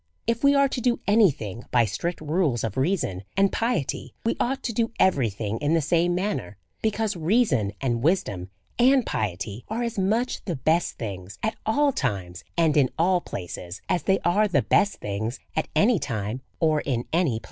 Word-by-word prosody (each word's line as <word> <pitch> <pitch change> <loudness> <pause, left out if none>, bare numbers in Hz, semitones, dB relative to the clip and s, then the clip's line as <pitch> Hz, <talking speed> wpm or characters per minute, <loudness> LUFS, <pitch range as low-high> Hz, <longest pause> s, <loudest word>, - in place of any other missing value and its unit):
If 230 +2 -1
we 280 0 +6
are 280 0 +5
to 260 -2 -4
do 240 0 +1
any 210 -1 +5
thing 110 -5 -6
by 120 -2 +4
strict 165 - -3
rules 155 -5 0
of 110 -3 -3
reason 135 - 0 0.2
and 195 0 +4
piety, 230 - -2
we 230 - +1
ought 265 +2 -1
to 235 - -2
do 230 +1 0
everything 115 - +1
in 150 +3 +1
the - - +4
same 170 +3 +2
manner; 185 - -2 0.2
because 220 -1 0
reason, 160 - +2
and 120 -3 0
wisdom, 105 - 0 0.3
and 255 0 +5
piety, 100 +2 -3
are 230 +3 -2
as 235 -3 -2
much 220 +6 0
the 175 - -2
best 160 +6 +1
things 100 -3 -6
at 220 - 0
all 285 +6 +3
times 95 - -3
and 160 -3 +3
in 135 -3 +4
all 175 +2 +3
places, 90 - -7
as 180 -2 +1
they 190 0 +2
are 205 +5 +3
the 190 - +2
best 205 - +3
thing's 110 +4 -4 0.2
at 155 - 0
any 215 -1 +4
time 110 0 -3 0.2
or 155 -3 +2
in 120 -3 -2
any 170 -6 +2
place. 110 - -2
165 Hz, 190 wpm, -25 LUFS, -, 0.3 s, we